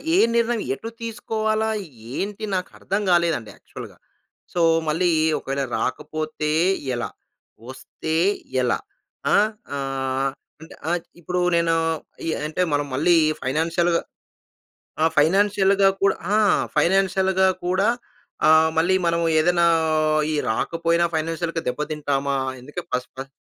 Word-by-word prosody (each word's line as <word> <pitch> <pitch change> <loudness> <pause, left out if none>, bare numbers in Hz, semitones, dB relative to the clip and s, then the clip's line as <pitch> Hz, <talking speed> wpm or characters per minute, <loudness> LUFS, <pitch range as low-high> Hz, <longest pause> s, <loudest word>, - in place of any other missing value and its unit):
ఏ - - +4 0.2
నిర్ణయం 235 -1 +1
ఎటు 225 +11 -6
తీసుకోవాలా 220 -1 -1 0.5
ఏంటి, 210 +2 -4
నాకు 180 0 -2
అర్థం 195 +2 -2
గాలేదండి 170 -10 +1
యాక్చువల్‌గా. - - -11 0.6
సో, 175 - 0 0.3
మళ్ళీ 165 +4 +2 0.3
ఒకవేళ 135 +1 -3
రాకపోతే 155 +5 -3 0.4
ఎలా? 120 - -3 0.6
వస్తే 155 +4 -5 0.5
ఎలా? 125 -1 +1 0.5
ఆహ్, 215 +1 +4 0.2
ఆహ్, 135 0 -1 0.3
అంటే 160 - -12 0.4
ఇప్పుడు 180 +2 -2 0.2
నేను 170 -1 +2 0.5
ఈ - - 0 0.2
అంటే 155 +4 -2
మనం 145 0 +1
మళ్ళీ 165 +6 +4 0.3
ఫైనాన్షియల్‌గా 165 +5 +1 1.0
ఆ! - - +5
ఫైనాన్షియల్‌గా 195 +4 +4
కూడా 195 - +3 0.2
ఆ! - - +4 0.4
ఫైనాన్షియల్‌గా 190 +1 +3 0.2
కూడా 185 +3 +2 0.6
ఆహ్, 160 0 +6
మళ్ళీ 175 +4 +3
మనము 170 0 +1
ఏదైనా 170 +2 +3 0.7
ఈ - - 0 0.2
రాకపోయినా 165 +7 +1
ఫైనాన్షియల్‌గా 165 +1 -2
దెబ్బ 135 - -4
తింటామా? 140 -2 -1 0.3
అందుకే 145 +7 -7
ఫస్ట్, 125 0 -2
ఫస్ట్ 135 +1 -6
170 Hz, 115 wpm, -23 LUFS, 145-190 Hz, 1.0 s, ఆహ్